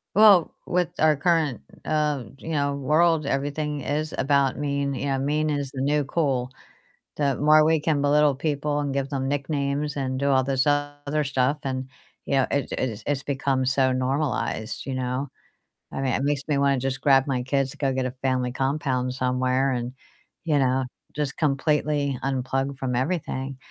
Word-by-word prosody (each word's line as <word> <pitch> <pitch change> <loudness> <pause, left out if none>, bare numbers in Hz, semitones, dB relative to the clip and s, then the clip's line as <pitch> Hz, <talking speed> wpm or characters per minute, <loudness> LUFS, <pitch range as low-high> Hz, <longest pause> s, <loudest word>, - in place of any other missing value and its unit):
Well, 200 -5 +6
with 180 -2 +1
our 155 0 +5
current, 155 -3 +1 0.2
um, 150 -7 -1
you 160 - -9
know, 145 -2 0
world, 155 +3 +2
everything 145 +1 -2
is 155 +3 -2
about 140 0 +2
mean, 140 -1 -1
you 135 +1 -3
know, 135 -1 0
mean 150 +3 0
is 140 -2 -2
the 130 -2 -5
new 145 +1 +2
cool, 130 -4 -1 0.6
the 140 -2 0
more 155 +1 +5
we 160 0 +3
can 150 -2 0
belittle 145 -1 +4
people 145 0 -1
and 140 -1 -2
give 135 0 -1
them 135 -2 -2
nicknames 145 0 -1
and 130 -1 -2
do 140 - +1
all 130 -1 +4
this 135 +1 0
other 145 +1 0
stuff 135 +1 0
and, 130 -1 -3 0.4
you - - -2
know, 135 - +3
it 140 -2 0
it 115 -5 -2
it's 140 -1 -1
become 135 -1 0
so 130 0 +2
normalized, 130 -3 -2
you 135 - -3
know? 130 +2 -2 0.6
I 135 - -4
mean, 130 -3 0
it 135 - 0
makes 145 -1 0
me 150 -2 +1
wanna 140 -1 +2
just 135 +1 -3
grab 135 -1 +4
my 125 -2 -1
kids 135 +1 0
to - - -13
go 135 -2 0
get 130 0 -1
a - - -4
family 130 -2 0
compound 130 -2 -1
somewhere 130 +1 +1
and, 120 0 -3 0.5
you 155 -3 +1
know, 130 -1 +2 0.3
just 145 -2 -2
completely 145 -1 +1
unplug 135 +1 -1
from 125 -2 -2
everything, 135 -2 -2
140 Hz, 180 wpm, -25 LUFS, 130-150 Hz, 0.6 s, Well